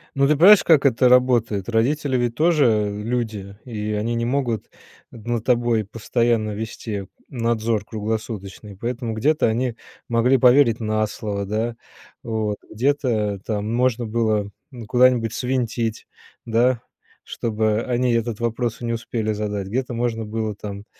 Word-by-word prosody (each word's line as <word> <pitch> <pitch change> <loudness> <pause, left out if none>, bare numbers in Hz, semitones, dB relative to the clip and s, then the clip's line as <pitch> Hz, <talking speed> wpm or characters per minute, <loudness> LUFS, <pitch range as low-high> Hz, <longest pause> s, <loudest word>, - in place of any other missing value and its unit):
Ну, 140 0 +3
ты 150 - +3
понимаешь, 190 +7 +7
как 155 -4 +4
это 125 -1 +4
работает? 120 -6 +3
Родители 130 +4 +1
ведь 120 -1 -1
тоже 115 -10 +2
люди, 110 -4 -3
и 105 -3 -4
они 110 +3 -1
не 115 0 -1
могут 120 -4 -1 0.4
над 115 0 -4
тобой 120 -3 +2
постоянно 115 +1 0
вести 105 -1 -5 0.2
надзор 115 -3 -1
круглосуточный, 105 -2 -5
поэтому 120 0 -3
где-то 150 +8 +2
они 120 +1 -1 0.3
могли 120 +3 +3
поверить 125 -1 +5
на 110 -1 0
слово, 100 -1 -4
да, 110 +3 -2 0.5
вот, 110 -2 -2
где-то 115 -5 0
там 105 0 -2
можно 125 -1 +1
было, 110 -2 0 0.2
ну, 120 -4 -9
куда-нибудь 125 -1 +3
свинтить, 120 -3 -2 0.4
да, 120 +1 +2 0.4
чтобы 110 -1 -1
они 125 0 0
этот 115 -2 -1
вопрос 115 0 -2
и - - -4
не 115 - -1
успели 115 -1 -2
задать, 105 -2 -3
где-то 125 +4 -2
можно 115 -1 -1
было 110 0 -3
там, 100 0 -8
115 Hz, 140 wpm, -22 LUFS, 110-125 Hz, 0.5 s, понимаешь